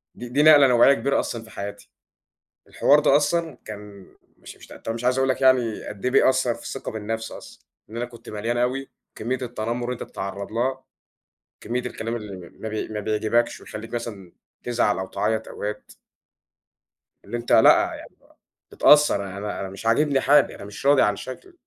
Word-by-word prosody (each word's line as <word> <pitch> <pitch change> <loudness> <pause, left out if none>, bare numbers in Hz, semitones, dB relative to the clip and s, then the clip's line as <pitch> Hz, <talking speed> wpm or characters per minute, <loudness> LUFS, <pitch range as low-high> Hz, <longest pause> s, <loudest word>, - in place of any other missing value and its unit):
دي 120 0 -8
دي 145 +4 +2
نقلة 145 -3 +8
نوعية 125 +2 +6
كبيرة 135 +3 0
أصلًا 115 -1 -4
في 110 - -15
حياتي، 100 0 -8 0.8
الحوار 145 +1 +4
ده 145 -1 +4
أصلًا 160 -2 0
كان 105 -2 -10 0.3
مش - - -12
مش - - -15
ط - - -15
طَب 115 - -5
مش 115 +1 -6
عايز 125 +1 +2
أقول 135 0 +2
لك 130 - 0
يعني 130 -4 +3
قد 105 +2 -9
إيه 125 - +2
بيأثّر 130 -3 +3
في - - -13
الثقة 135 - -6
بالنَفْس 110 +1 -4
أصلًا، - - -12 0.3
إن 115 - -9
أنا 120 - -2
كنت 120 -1 -15
مليان 115 +3 -3
أوي، 130 +3 -1 0.3
كمّية 125 +4 -3
التنمر 120 0 -3
اللي 125 - -1
أنت 125 - -6
بتتعرّض 100 +1 -6
لها، 130 +3 -1 0.8
كمّية 120 +3 -2
الكلام 115 -2 -4
اللي 100 -6 -8
ما 110 - -5
بي 110 0 -3
ما 105 -1 -5
بيعجِبكش 110 +3 0
ويخلّيك 115 +2 -9
مثلًا 105 -7 -6 0.3
تزعَل 120 -5 +1
أو 95 - -4
تعيّط 110 +2 -1
أوقات 105 0 -6 1.3
اللي 120 +4 -4
أنت 120 - -6
لأ، - - +6
يعني - - -12
بقى - - -27 0.4
متأثّر 150 -9 +5
أنا 105 +1 -4
أنا 95 - -4
مش 95 +3 -10
عاجبني 140 +4 +3
حالي، 145 0 +4
أنا - - -10
مش 105 +6 -10
راضي 140 -1 +5
عن 105 - +3
شكْلي، 345 - -9
115 Hz, 190 wpm, -24 LUFS, 105-130 Hz, 1.3 s, نقلة